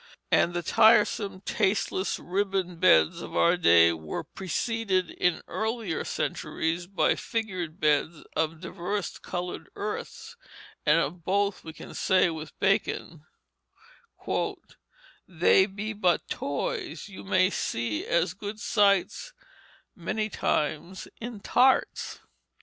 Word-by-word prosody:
And 175 - +3
the 175 - -1
tiresome, 210 -2 +4
tasteless 195 -1 0
ribbon 190 -1 -2
beds 80 - +4
of - - -8
our 170 +1 +5
day 85 - +6
were 80 -1 -5
preceded 195 -1 -1
in 180 -2 0
earlier 220 -5 -2
centuries 165 +2 -2
by 195 0 +2
figured 185 -8 -4
beds 150 +1 +1
of 160 0 -1
diverse 185 +2 -4
colored 180 0 -5
earths 210 +1 -6 0.5
and 150 +2 +6
of 170 +1 -3
both 200 +2 0
we 160 - -7
can - - -11
say 185 -2 +3
with 155 -1 -8
Bacon, 170 -5 -1 2.0
"they 180 +2 +4
be 210 +2 -5
but 180 -5 +1
toys, 145 +3 -3
you 200 - -10
may 185 -1 +3
see 115 - -2
as 170 0 +1
good 205 +2 -7
sights 205 - +1 0.6
many 215 -1 -2
times 155 +1 -2
in 230 -3 -7
tarts." 260 +5 +2
185 Hz, 115 wpm, -27 LUFS, 165-205 Hz, 2.0 s, day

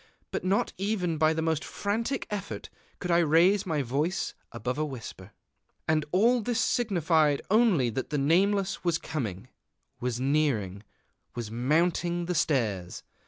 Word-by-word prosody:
But - - -3
not 190 +2 +1
even 185 -6 -1
by 155 0 +4
the 160 0 -1
most 160 -1 0
frantic 230 +6 -2
effort 205 -1 -5 0.3
could 180 - -3
I 170 - +5
raise 175 +5 +4
my 155 -4 0
voice 150 +9 -1 0.2
above 125 +4 -3
a - - +1
whisper.... 135 -6 -7 0.6
And 155 -1 +2
all 235 +6 +4
this 235 +1 -1
signified 165 - +2
only 200 - +4
that 130 - -4
the 150 - -1
Nameless 190 +7 +2
was 170 -2 +2
coming, 120 - -5 0.5
was 125 -1 -2
nearing, 130 -9 0 0.5
was 115 -3 -5
mounting 170 +7 +1
the 180 - -1
stairs. 110 - -1
160 Hz, 145 wpm, -28 LUFS, 135-190 Hz, 0.6 s, I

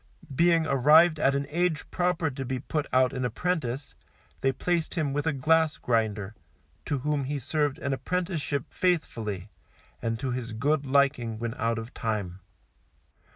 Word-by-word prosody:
Being 165 +1 +4
arrived 155 +4 +5
at 140 -2 +3
an 140 0 -1
age 170 -1 0
proper 175 -3 0
to 135 +1 -5
be 130 0 -2
put 145 +3 -3
out 130 0 +3
an 130 - -2
apprentice, 145 -2 -2 0.5
they 135 - +2
placed 170 +6 -1
him 150 -5 0
with 145 +2 -1
a - - +3
glass 160 +3 +2
grinder, 110 -4 -1 0.5
to 145 - -1
whom 145 +1 -1
he 145 +2 -2
served 145 +1 -1
an 140 -1 -2
apprenticeship 155 -4 -2
faithfully, 110 - -1 0.5
and 115 0 -1
to 130 -1 -2
his 120 -2 -4
good 140 +5 0
liking 130 -5 +2
when 115 0 -3
out 115 -2 -1
of 115 +2 -6
time. 100 -5 -3
140 Hz, 155 wpm, -27 LUFS, 120-155 Hz, 0.5 s, arrived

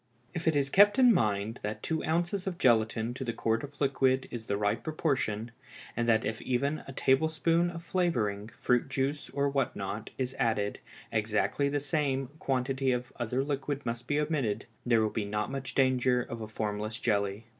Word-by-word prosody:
_ - - -44 0.3
If 175 -1 -4
it 160 - +4
is 140 -1 +1
kept 205 +1 +6
in 250 -3 +7
mind 105 - 0
that 105 +1 -4
two 160 -1 -1
ounces 175 +4 0
of 180 -3 -2
gelatine 115 -3 +2
to 130 - -5
the 120 - -1
quart 115 0 0
of 145 0 -9
liquid 135 -2 +2
is 115 -2 -6
the 100 - 0
right 105 0 0
proportion, 130 -8 -1 0.4
and 120 0 0
that 110 -1 +3
if 110 +1 -3
even 140 +4 0
a - - -6
tablespoonful 160 +6 +2
of 165 - -7
flavoring, 120 - 0
fruit 125 +3 0
juice, 135 +2 -1
or 140 0 0
what 140 -1 0
not, 100 +2 -4
is 130 0 -2
added, 105 -3 0 0.3
exactly 110 +6 +1
the 145 +1 0
same 140 -3 -1
quantity 135 0 0
of 125 0 -2
other 125 +3 0
liquid 140 -1 -3
must 115 0 -4
be 145 0 +1
omitted, 140 -9 -1 0.2
there 115 -2 +4
will 105 - -3
not 105 +2 -1
be - - -7
much 135 -1 -5
danger 130 -2 +3
of 115 -3 -7
formless 105 0 -3
jelly. 100 -1 0
130 Hz, 190 wpm, -30 LUFS, 110-145 Hz, 0.4 s, in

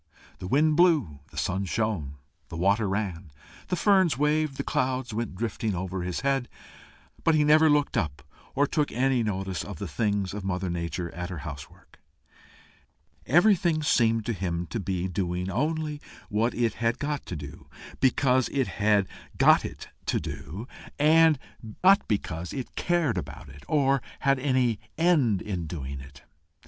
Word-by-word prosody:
The 90 - -6
wind 150 +7 +3
blew, 150 - +3
the - - -15
sun 95 +1 -1
shone, 90 -6 -2 0.3
the 80 - -6
water 100 +4 +2
ran, 95 -5 -3 0.4
the 180 - 0
ferns 190 - +3
waved, 150 0 +1
the - - -2
clouds 130 -2 -1
went 110 -3 -3
drifting 110 0 -2
over 95 +1 -3
his 90 0 -3
head, 135 -2 0 0.7
but 165 - +4
he 150 - +4
never 155 +1 +6
looked 145 -1 +2
up, 75 -5 -2 0.3
or 145 - +4
took 150 0 0
any 130 0 +2
notice 95 -4 -2
of 100 -5 -7
the 100 - -5
doings 100 -2 -1
of 105 -1 -5
Mother 95 -1 -2
Nature 85 0 -4
at 90 +1 -5
her 90 - -5
house 70 -1 -7
work: - - -22 1.3
everything 175 - +4
seemed 115 -6 +2
to 115 - -1
him 90 -3 -2
to 115 - -2
be 95 -2 -2
doing 90 0 -2
only 150 - -1 0.3
what 115 +2 0
it 115 -1 +1
had 115 +1 +1
got 145 0 -3
to 90 - -4
do, 75 -2 -9 0.3
because 130 -1 +3
it 135 -2 0
had 105 -2 +2 0.3
got - - +6
it - - -8 0.2
to - - +1
do, 95 - -7 0.3
and 160 +1 +5 0.5
not 195 +2 +6
because 90 -5 -3
it 130 -3 -6
cared 165 - +1
about 75 - -9
it, 70 0 -13
or 135 -2 +2 0.2
had 135 -1 +3
any 130 -5 +1 0.2
end 150 - +3
in 90 -5 -4
doing 70 -4 -5
it. 70 0 -13
110 Hz, 165 wpm, -27 LUFS, 90-145 Hz, 1.3 s, never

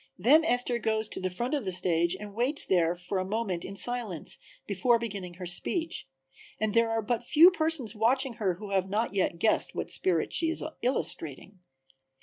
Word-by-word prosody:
Then 300 +8 +5
Esther 245 -4 +2
goes 220 -1 0
to - - -5
the 185 - -2
front 240 +10 -3
of 285 -4 0
the 190 - -3
stage 175 -1 +2
and 205 -1 -8
waits 250 +7 +1
there 175 -2 +2
for 180 +2 -3
a - - -1
moment 195 -3 -2
in 195 - -7
silence 220 -5 -1 0.3
before 220 +5 +2
beginning 200 -6 -6
her 180 0 -7
speech, 320 - -2 0.5
and 215 -1 0
there 230 0 +3
are 225 0 -1
but 240 +2 -1
few 320 +8 +7
persons 315 - -1
watching 250 +4 +1
her 185 -4 +1
who 205 +2 -9
have 190 -1 0 0.2
yet 185 -3 0
guessed 215 +6 +1
what - - -4
spirit 175 -4 +1
she 330 - +1
is 330 - -3 0.2
illustrating. 185 - -2
215 Hz, 185 wpm, -28 LUFS, 185-245 Hz, 0.5 s, few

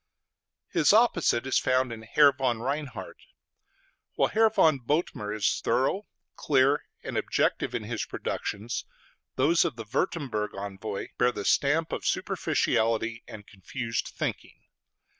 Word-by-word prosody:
His 165 +2 +3
opposite 180 - +3
is 135 - +2
found 130 -1 +1
in 110 - -8
Herr 140 +5 +5
von 130 -3 -1
Reinhard. 140 +3 -4 1.0
While - - +2
Herr 220 0 +4
von 160 -9 +3
Bothmer 125 -5 -1
is 105 -2 0
thorough, 190 +11 +1 0.3
clear, 140 0 +2 0.2
and - - -2
objective - - 0
in - - -2
his - - -3
productions, 110 +4 -4 0.5
those 160 +6 +4
of - - -2
the 115 -1 -7
Würtemberg 115 - -2
envoy 100 +1 -5
bear 125 0 +4
the 100 -4 -6
stamp 155 +3 +2
of - - -3
superficiality 115 +1 0
and 105 -1 -10
confused 115 +4 -4
thinking. - - -5
130 Hz, 130 wpm, -27 LUFS, 110-150 Hz, 1.0 s, Herr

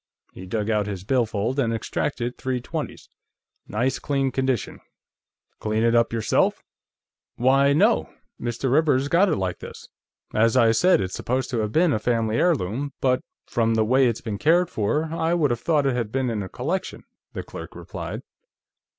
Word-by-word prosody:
He 95 - -10
dug 105 +2 -2
out 105 -2 +1
his 95 -3 -5
billfold 115 +2 0
and 120 -4 +1
extracted 120 +2 -2
three 130 -1 -2
twenties. 120 - -6 0.6
"Nice 120 +5 -1
clean 135 -2 0
condition; 130 -3 -1 0.8
clean 110 +1 0
it 115 0 +3
up 115 0 +3
yourself?" 115 -2 +1 0.7
"Why, 135 +3 +4
no. 210 +10 +3 0.3
Mr. 120 +2 -2
Rivers 145 -3 +3
got 185 +6 +4
it - - +2
like 95 -2 -3
this. - - -10 0.4
As 115 +3 +3
I 115 -3 +5
said, 180 - +4
it's 95 -1 -3
supposed 130 +1 -2
to 120 - 0
have 105 -1 -1
been 165 +2 +3
a - - 0
family 115 -1 0
heirloom, 140 - 0
but 130 -1 +2 0.2
from 115 -2 +1
the 110 -1 +2
way 130 +3 +4
it's 115 -2 -2
been 105 -4 -4
cared 175 +3 +3
for, 110 +9 0
I 165 +1 -1
would 150 -6 +2
have 120 -1 -2
thought 150 -4 +2
it 135 -2 +1
had 115 -4 -2
been 130 -1 0
in 110 -2 -2
a 95 - -6
collection," 175 +9 -3 0.3
the - - -5
clerk - - -9
replied. - - -7
125 Hz, 175 wpm, -24 LUFS, 110-140 Hz, 0.8 s, I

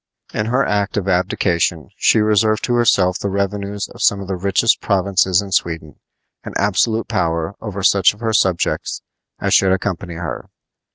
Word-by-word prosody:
In 105 0 -2
her 130 +3 +1
act 100 -1 -1
of 100 -2 -2
abdication 90 -3 0
she 110 - +3
reserved 110 0 +2
to 120 - 0
herself 100 -6 +2
the 100 - -2
revenues 100 +1 -3
of - - -12
some 100 - +3
of 100 - -7
the 95 - -2
richest 95 +1 +1
provinces 95 0 +1
in 100 - -9
Sweden 80 -4 -2 0.4
and - - -8
absolute 110 +3 +1
power 85 +2 -1
over 100 -3 -5
such 100 +1 +4
of - - -20
her 115 -1 -2
subjects 95 -5 0 0.4
as - - 0
should 95 -1 +4
accompany 95 -2 -2
her. 80 -8 -6
100 Hz, 170 wpm, -18 LUFS, 90-105 Hz, 0.4 s, such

